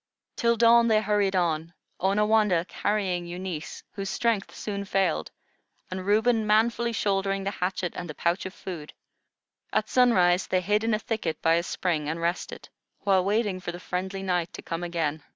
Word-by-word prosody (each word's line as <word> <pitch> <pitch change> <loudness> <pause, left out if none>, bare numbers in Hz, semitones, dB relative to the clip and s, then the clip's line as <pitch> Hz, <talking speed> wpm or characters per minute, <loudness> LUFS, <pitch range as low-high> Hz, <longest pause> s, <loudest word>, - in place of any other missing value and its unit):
Till 235 0 +2
dawn 235 +1 +6
they 220 -1 +4
hurried 205 -2 +1
on, 165 -1 0 0.2
Onawandah 210 -2 +3
carrying 185 -2 -1
Eunice, 175 -2 -6
whose 195 -1 -5
strength 225 -3 0
soon 200 -2 -4
failed, 195 -4 0 0.6
and 185 +1 -5
Reuben 220 +1 +3
manfully 235 +2 +2
shouldering 195 -2 0
the 200 - -1
hatchet 180 -2 -2
and 175 - -6
the 150 - -6
pouch 175 +2 0
of 185 - -10
food. 165 -5 -7 0.8
At - - 0
sunrise 185 -8 +4
they 185 - +1
hid 210 +4 +1
in 225 -1 +2
a - - 0
thicket 215 -7 -3
by 165 - +4
a 170 - +3
spring 165 -4 -2
and 160 +2 -3
rested, 170 +2 -3 0.3
while 190 -2 +3
waiting 205 -1 0
for 180 - -5
the 175 - -8
friendly 190 +2 -4
night 180 -3 0
to - - -8
come 165 +1 -4
again. 160 -3 -2
190 Hz, 170 wpm, -27 LUFS, 175-210 Hz, 0.8 s, dawn